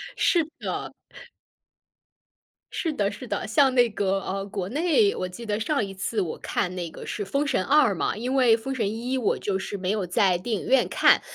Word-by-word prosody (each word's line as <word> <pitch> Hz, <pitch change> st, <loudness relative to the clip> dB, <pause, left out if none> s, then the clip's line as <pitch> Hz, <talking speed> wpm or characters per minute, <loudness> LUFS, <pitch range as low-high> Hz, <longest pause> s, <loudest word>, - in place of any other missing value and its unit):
是 340 Hz, -3 st, +3 dB
的。 -, -, -4 dB, 1.8 s
是 330 Hz, -, -2 dB
的， 205 Hz, -9 st, 0 dB
是 255 Hz, -, -9 dB
的， -, -, -3 dB
像 260 Hz, +4 st, +4 dB
那 245 Hz, -1 st, +5 dB
个， 195 Hz, -2 st, 0 dB
呃， 195 Hz, +1 st, -3 dB
国 195 Hz, -2 st, -4 dB
内， 350 Hz, -, +2 dB
我 185 Hz, -, -3 dB
记 205 Hz, +6 st, -9 dB
得 210 Hz, -1 st, -1 dB
上 225 Hz, +1 st, 0 dB
一 195 Hz, -, -8 dB
次 195 Hz, +3 st, -2 dB
我 175 Hz, -5 st, -2 dB
看 180 Hz, 0 st, -2 dB
那 175 Hz, -2 st, -4 dB
个 -, -, -10 dB
是 205 Hz, -, -3 dB
《封 280 Hz, +8 st, 0 dB
神》 275 Hz, -, 0 dB
2 280 Hz, -7 st, +5 dB
嘛， 180 Hz, -, -1 dB
因 245 Hz, +4 st, -2 dB
为 245 Hz, -4 st, +5 dB
《封 265 Hz, +4 st, -4 dB
神》 230 Hz, -5 st, -1 dB
1 240 Hz, +5 st, -2 dB
我 250 Hz, -, +1 dB
就 200 Hz, -2 st, -1 dB
是 195 Hz, +1 st, -5 dB
没 185 Hz, 0 st, -1 dB
有 210 Hz, -3 st, -1 dB
在 180 Hz, +1 st, +2 dB
电 215 Hz, +4 st, -2 dB
影 -, -, -8 dB
院 265 Hz, -1 st, +4 dB
看。 -, -, +5 dB
215 Hz, 210 characters per minute, -25 LUFS, 195-265 Hz, 1.8 s, 那